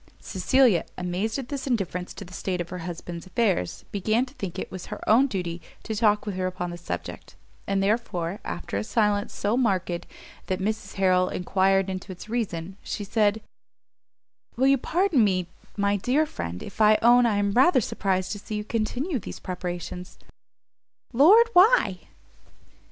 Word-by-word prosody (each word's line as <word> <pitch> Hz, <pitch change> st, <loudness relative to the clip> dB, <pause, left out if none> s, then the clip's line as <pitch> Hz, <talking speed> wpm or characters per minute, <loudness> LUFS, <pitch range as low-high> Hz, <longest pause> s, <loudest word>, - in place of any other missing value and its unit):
Cecilia, 220 Hz, 0 st, +3 dB
amazed 185 Hz, +6 st, -2 dB
at 265 Hz, -3 st, -6 dB
this 280 Hz, -1 st, -4 dB
indifference 185 Hz, -7 st, -2 dB
to 200 Hz, -, -8 dB
the 180 Hz, -, -14 dB
state 180 Hz, 0 st, -3 dB
of 175 Hz, -, -4 dB
her 180 Hz, -, -6 dB
husband's 170 Hz, +1 st, -7 dB
affairs, 185 Hz, -, 0 dB
began 215 Hz, +5 st, +1 dB
to 255 Hz, -, -16 dB
think 195 Hz, -10 st, -6 dB
it -, -, -5 dB
was 185 Hz, -1 st, -7 dB
her -, -, -6 dB
own 245 Hz, +6 st, +5 dB
duty 175 Hz, -7 st, -4 dB, 0.2 s
to 220 Hz, -, -4 dB
talk 210 Hz, -1 st, +2 dB
with 205 Hz, -, -3 dB
her 185 Hz, 0 st, 0 dB
upon 180 Hz, -1 st, -4 dB
the 175 Hz, -, -6 dB
subject: 175 Hz, -, -6 dB, 0.3 s
and 195 Hz, 0 st, +1 dB
therefore, 195 Hz, -4 st, -1 dB
after 175 Hz, -, -4 dB
a 100 Hz, -, -1 dB
silence 205 Hz, -, +1 dB
so 205 Hz, +3 st, -1 dB
marked 185 Hz, -8 st, 0 dB, 0.4 s
that 185 Hz, 0 st, -1 dB
Mrs 215 Hz, +3 st, -3 dB
Harrel 185 Hz, -1 st, +3 dB
enquired 195 Hz, +1 st, +1 dB
into 190 Hz, +1 st, -5 dB
its 185 Hz, +3 st, -10 dB
reason, 195 Hz, -6 st, -3 dB
she 205 Hz, -, -5 dB
said, 210 Hz, +1 st, +1 dB, 1.1 s
"Will 260 Hz, -, +2 dB
you 275 Hz, 0 st, +5 dB
pardon 345 Hz, -, +2 dB
me, 185 Hz, -3 st, +1 dB, 0.3 s
my 200 Hz, 0 st, +2 dB
dear 260 Hz, +10 st, +2 dB
friend, 85 Hz, -, -6 dB
if -, -, -6 dB
I 215 Hz, 0 st, +6 dB
own 240 Hz, +1 st, +6 dB
I 210 Hz, -3 st, +1 dB
am 200 Hz, 0 st, +1 dB
rather 260 Hz, -, +5 dB
surprized 190 Hz, -4 st, -1 dB
to 205 Hz, -, -4 dB
see 215 Hz, -, -6 dB
you 210 Hz, -, -2 dB
continue 245 Hz, -, -2 dB
these -, -, -8 dB
preparations?" 180 Hz, 0 st, -6 dB, 1.0 s
"Lord, 390 Hz, -, +7 dB
why?" 360 Hz, -, +5 dB
200 Hz, 170 wpm, -25 LUFS, 180-235 Hz, 1.1 s, Lord